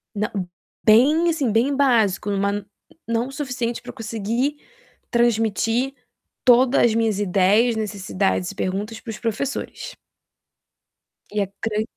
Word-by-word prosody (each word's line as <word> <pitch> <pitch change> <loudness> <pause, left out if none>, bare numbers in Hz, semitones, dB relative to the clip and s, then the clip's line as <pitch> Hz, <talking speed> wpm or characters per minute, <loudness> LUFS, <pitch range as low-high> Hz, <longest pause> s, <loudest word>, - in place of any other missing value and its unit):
Não 210 +1 -1 0.6
bem, 285 +10 +5
assim, 295 -8 0
bem 245 +6 +2
básico, 225 -8 +2
em 200 - 0
uma 200 0 -1 0.4
não 230 +3 -1
suficiente 255 -4 -3
para - - -11
eu - - -7
conseguir 230 +6 -2 0.5
transmitir 235 +2 +1 0.5
toda 250 +1 +5
as 235 - +4
minhas 225 -3 +1
ideias, 205 +4 +3
necessidades 195 -3 -1
e - - -14
perguntas 205 +5 -3
para 235 - -11
os 215 - -7
professores. 235 +4 -4 1.4
E 210 0 0
a - - -5 0.2
gran 215 -1 0
225 Hz, 130 wpm, -22 LUFS, 205-245 Hz, 1.4 s, bem